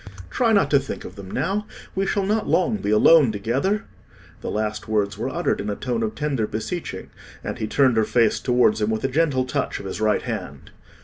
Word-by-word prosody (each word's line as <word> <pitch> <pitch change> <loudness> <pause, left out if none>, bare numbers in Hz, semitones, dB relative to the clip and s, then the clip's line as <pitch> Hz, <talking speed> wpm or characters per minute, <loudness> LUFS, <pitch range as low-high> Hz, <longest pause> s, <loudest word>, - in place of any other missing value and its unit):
Try 235 -3 +2
not 205 -2 +3
to 140 - +6
think 135 - -6
of - - -9
them 100 -2 -9
now; 195 - -1 0.3
we 195 +1 -1
shall 200 -1 0
not 215 +2 0
long 210 +4 +2
be 150 - -3
alone 125 +5 +6
together." 130 - -1 0.6
The - - -4
last 105 0 -2
words 105 -2 0
were - - -3
uttered - - -1
in 105 - -4
a 100 - -2
tone 120 0 -2
of 110 -1 -2
tender 135 -7 -1
beseeching, 110 - -5 0.3
and - - -5
he 110 - -2
turned 130 0 +3
her 110 - +4
face 115 0 +2
towards 125 -3 +2
him 105 - +1
with 110 -1 -2
a - - +2
gentle 135 -2 +1
touch 135 +1 -2
of - - -9
his 95 +2 -5
right 110 -1 +2
hand. - - -6
125 Hz, 220 wpm, -23 LUFS, 110-165 Hz, 0.6 s, to